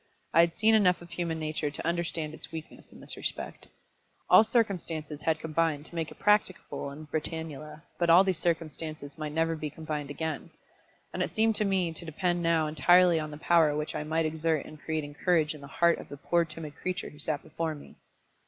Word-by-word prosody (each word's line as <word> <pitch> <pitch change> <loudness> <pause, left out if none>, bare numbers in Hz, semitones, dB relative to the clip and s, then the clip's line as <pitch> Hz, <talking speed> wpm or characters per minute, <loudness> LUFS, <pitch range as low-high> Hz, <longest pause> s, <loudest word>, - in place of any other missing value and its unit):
I 165 - +5
had 170 0 +4
seen 220 +1 +4
enough 180 -5 +4
of 175 - -14
human 165 -1 -2
nature 155 -1 -2
to 145 - -7
understand 170 -2 -1
its 155 - -8
weakness 160 -1 -9
in - - -14
this - - -7
respect. - - -5 0.6
All - - +9
circumstances 165 - -1
had 160 0 +1
combined 160 -2 0
to - - -15
make 165 -2 -2
it - - -13
practicable 210 -8 +1
in 150 +3 -9
Britannula, 155 0 -5 0.2
but 170 -1 +2
all 175 +3 +8
these 190 -4 0
circumstances 155 -3 -3
might 155 -1 -3
never 165 +1 +1
be 155 -1 -4
combined 150 -1 -5
again. 160 +2 -4 0.6
And - - -2
it - - 0
seemed 220 0 +2
to 210 - +1
me 185 -4 +1
to 160 - -7
depend 175 +2 -1
now 165 -2 +3
entirely 175 +2 +5
on 155 0 -4
the 150 - -8
power 160 -2 +4
which 150 0 -3
I - - -3
might 160 +1 0
exert 160 -1 0
in 155 - -11
creating 155 -2 -3
courage 160 -4 +3
in 150 - -11
the 140 - -9
heart 170 +4 +3
of - - -10
the 145 - -8
poor 170 +4 +1
timid 155 -2 -7
creature 185 0 -3
who 150 - -15
sat 150 -1 -1
before 160 0 -3
me. 145 - -13
160 Hz, 210 wpm, -29 LUFS, 155-170 Hz, 0.6 s, All